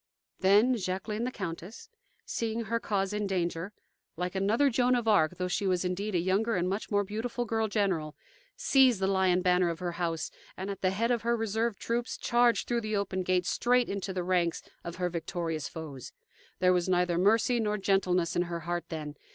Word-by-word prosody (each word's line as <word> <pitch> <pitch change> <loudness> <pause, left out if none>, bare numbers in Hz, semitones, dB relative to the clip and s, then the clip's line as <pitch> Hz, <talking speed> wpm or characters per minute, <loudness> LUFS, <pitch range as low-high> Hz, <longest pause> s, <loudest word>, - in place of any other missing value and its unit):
Then 210 +6 +4
Jacqueline 210 +4 -3
the 255 - -2
Countess, 185 0 -7 0.4
seeing 230 0 -2
her 230 +2 -1
cause 195 -2 -1
in 210 -1 -1
danger 175 0 -2 0.5
like 180 +1 -2
another 215 +9 +2
Joan 250 +1 +3
of 240 -2 -1
Arc, 180 -5 +3
though 180 0 -1
she 195 +2 -1
was 185 -1 +1
indeed 195 +3 -2
a - - +3
younger 200 +6 +1
and 180 0 0
much 195 +3 -3
more 205 -1 +2
beautiful 230 +4 -3
girl 225 0 0
general, 190 -8 -1 0.4
seized 265 - +4
the 190 - +1
lion 190 -2 +2
banner 180 -1 +3
of 165 - -3
her 180 0 -3
house, 165 -2 -2 0.3
and, 190 +2 -4
at 195 - -7
the 185 - +3
head 225 +6 0
of 235 -2 +1
her 235 +1 +1
reserve 225 0 -1
troops, 235 +1 -2
charged 240 -3 +2
through 240 -1 0
the 215 -1 -2
open 195 -2 -1
gate 180 -1 +1
straight 245 +4 +2
into 195 -1 -3
the 185 -1 -2
ranks 175 -2 0 0.2
of 170 - -6
her 180 -1 -1
victorious 165 -2 -3
foes. 150 -6 -8 0.4
There 185 0 +4
was 180 0 0
neither 180 -1 +2
mercy 225 +5 +3
nor 210 -1 0
gentleness 185 -3 +1
in - - +2
her 170 -1 -4
heart 175 +1 -3
then. 155 -3 -5
195 Hz, 200 wpm, -29 LUFS, 180-225 Hz, 0.5 s, Then